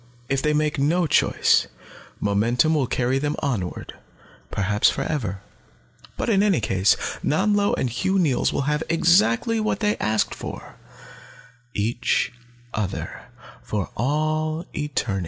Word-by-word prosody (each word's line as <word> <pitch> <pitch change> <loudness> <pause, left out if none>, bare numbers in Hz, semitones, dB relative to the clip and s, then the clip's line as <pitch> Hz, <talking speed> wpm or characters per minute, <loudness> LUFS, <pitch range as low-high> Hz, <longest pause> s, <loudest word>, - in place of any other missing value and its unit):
If 135 0 +1
they 150 - +1
make 150 -1 0
no 170 +5 +2
choice, 150 - +3 0.5
momentum 115 +9 +2
will 145 -5 +1
carry 125 +3 0
them 145 +1 -1
onward, 110 -11 -3 0.6
perhaps 100 +1 +2
forever. 110 -11 -3 0.8
"But - - -2
in 200 -4 +3
any 205 -4 +3
case, 95 -2 +2 0.3
Nanlo 205 +5 +2
and - - 0
Hugh 125 +12 0
Neils 155 -9 +2
will - - -1
have 150 +2 0
exactly 170 - +3
what 215 0 -1
they 210 - +1
have - - 0
asked 110 0 +1
for - - -8 1.0
each 115 +5 0 0.4
other, 100 -3 -4 0.4
for 105 -3 -3
all 155 +5 -1
eternity. 140 -9 -2
145 Hz, 130 wpm, -23 LUFS, 110-160 Hz, 1.0 s, choice